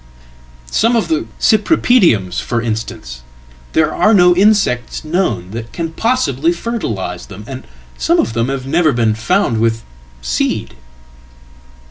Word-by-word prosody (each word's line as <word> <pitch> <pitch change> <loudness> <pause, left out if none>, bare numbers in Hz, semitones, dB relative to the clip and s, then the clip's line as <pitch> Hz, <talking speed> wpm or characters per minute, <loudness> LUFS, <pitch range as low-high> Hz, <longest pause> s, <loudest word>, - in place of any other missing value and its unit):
Some 230 +2 +2
of 230 - 0
theCypripediums, 220 - +2
for 120 - -2
instance; 110 - -5 0.5
there 155 -1 +2
are 215 0 +3
no 180 -2 +5
insects 195 - +2
known 155 - -1
that 115 +1 -7
can 165 -1 -4
possiblyfertilise 170 - -1
them, 100 +1 -10
and 130 +1 -8 0.3
some - - +2
of 115 - 0
them 115 +2 0
have 135 -1 -3
never 155 +1 +2
been 115 -2 +1
found 110 +1 0
with 115 0 0 0.4
seed."" 65 0 -2
135 Hz, 120 wpm, -16 LUFS, -, 0.5 s, no